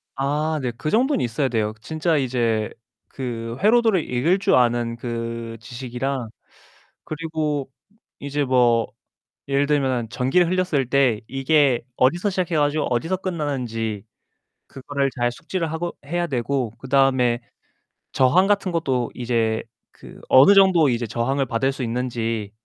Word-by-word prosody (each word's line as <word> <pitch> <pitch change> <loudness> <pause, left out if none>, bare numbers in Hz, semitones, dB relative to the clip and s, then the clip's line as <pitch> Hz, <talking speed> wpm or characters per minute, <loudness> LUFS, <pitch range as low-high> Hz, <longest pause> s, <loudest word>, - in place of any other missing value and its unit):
아 150 +3 -1
네. 125 -2 -2
그 155 - -3
정도는 255 - +2
있어야 125 +4 0
돼요. 110 -3 -1
진짜 160 +2 0
이제 120 -5 0 0.4
그 115 -3 -5
회로도를 220 -4 +3
읽을 155 +10 +2
줄 - - +3
아는 120 -1 +2
그 115 -1 -5
지식이랑 125 +1 -4 0.8
그리고 155 -3 -3 0.5
이제 145 +1 -2
뭐 120 -3 +3 0.6
예를 140 +1 +2
들면은 130 -5 0
전기를 135 +9 +2
흘렸을 180 -7 0
때 130 -6 +3
이게 135 -2 +2
어디서 175 +10 +2
시작해 180 -3 -1
가지고 150 0 +1
어디서 165 +10 -1
끝나는지 125 - -3 0.6
그거를 140 +1 -2
잘 120 0 +1
숙지를 165 +4 -4
하고 170 +2 -4
해야 175 +3 -1
되고 130 -3 -1
그다음에 130 -3 +2 0.7
저항 155 +9 +4
같은 200 -2 +1
것도 130 -8 -1
이제 115 -2 0 0.3
그 - - -14
어느 135 +10 +8
정도 185 -6 +5
이제 120 -1 -1
저항을 135 +5 -1
받을 130 +3 0
수 135 -1 -5
있는지 115 -3 -2
135 Hz, 285 characters per minute, -22 LUFS, 120-155 Hz, 0.8 s, 어느